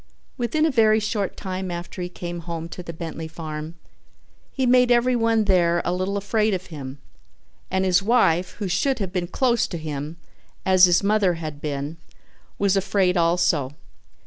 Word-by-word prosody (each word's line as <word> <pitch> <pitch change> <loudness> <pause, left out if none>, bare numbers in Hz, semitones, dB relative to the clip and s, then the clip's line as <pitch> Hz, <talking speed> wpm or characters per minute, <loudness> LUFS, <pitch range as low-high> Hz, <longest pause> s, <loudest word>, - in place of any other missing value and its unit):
Within 295 +6 0
a 320 - +2
very 220 -3 +4
short 210 -2 -2
time 190 -1 -4
after 175 +1 -6
he 175 - -3
came 175 -1 -6
home 165 -1 -5
to 180 - -7
the 170 - -7
Bentley 165 -1 -6
farm 160 0 -7 0.8
he 265 - -1
made 250 0 +5
everyone 235 -2 +3
there 175 -4 +3
a 175 - 0
little 185 +2 -1
afraid 215 +1 +1
of 185 0 -6
him, 135 -2 -7 0.7
and 190 0 0
his 180 0 +3
wife, 195 -6 +2
who 205 - -4
should 255 +9 +1
have 195 -5 -4
been 180 -2 -1
close 240 +4 +1
to 170 - -5
him 155 0 -5 0.5
as 185 -1 +7
his 175 +2 +3
mother 200 -3 +2
had 155 -3 -7
been, 145 +1 -4 0.6
was 200 -1 +2
afraid 195 -1 +1
also. 170 -5 +2
185 Hz, 170 wpm, -23 LUFS, 170-215 Hz, 0.8 s, as